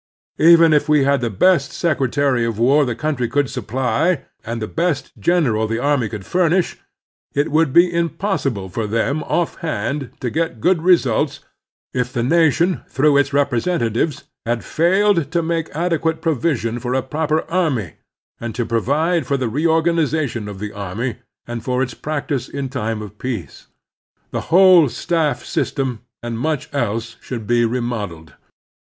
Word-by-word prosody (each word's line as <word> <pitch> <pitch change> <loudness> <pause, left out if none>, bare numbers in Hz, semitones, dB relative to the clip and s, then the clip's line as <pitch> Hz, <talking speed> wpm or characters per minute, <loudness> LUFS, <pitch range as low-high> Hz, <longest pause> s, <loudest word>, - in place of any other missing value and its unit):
Even 165 0 +7
if 150 0 +2
we 150 -2 +4
had 140 0 +2
the 120 - 0
best 140 - +3
secretary 140 -5 +1
of 115 -2 -2
war 135 +6 +4
the 120 -2 -2
cotmtry 135 -4 -2
could 145 -2 0
supply 130 - 0 0.2
and 115 0 -4
the 110 - -2
best 160 -2 -1
general 130 -12 +2
the 115 +1 -2
army 130 -3 +1
could 100 -3 -7
furnish, 180 0 +1 0.6
it 145 +1 +1
would 155 -2 +3
be 175 +4 +5
impossible 165 - -1
for 105 +4 -3
them 115 +8 0
offhand 150 -5 -2
to 125 - -3
get 160 -7 -2
good 175 - +2
results 145 -5 +2 0.5
if 125 -1 -1
the 120 -2 -1
nation, 165 +5 +2
through 145 +2 +3
its 140 -1 +3
repre 140 -4 +1
sentatives, 145 -4 -1 0.2
had 115 0 -2
failed 175 -1 +2
to 170 -1 +1
make 165 -1 -1
adequate 165 -1 0
provision 140 -7 -1
for 125 +1 -2
a 130 - 0
proper 155 +3 0
army, 150 - -1 0.5
and 115 -2 -5
to 120 - -1
provide 150 +10 0
for 140 - +1
the 130 -2 -1
reorgan 165 +4 +2
ization 140 -9 -1
of 100 - -7
the 105 +1 -5
army 105 +4 -4 0.3
and 120 -1 -6
for 125 0 0
its 125 -2 -4
practice 145 -4 -3
in 140 -2 -4
time 110 -4 -3
of 105 0 -11
peace. 120 -9 -5 0.6
The - - -2
whole 180 -3 +7
staff 160 +2 -1
system, 130 -5 -2 0.2
and 115 -1 -4
much 150 0 -2
else, 115 -3 -2
should 115 -4 -6
be 120 +1 +2
remodeled. 110 - -4
140 Hz, 160 wpm, -20 LUFS, 115-160 Hz, 0.6 s, Even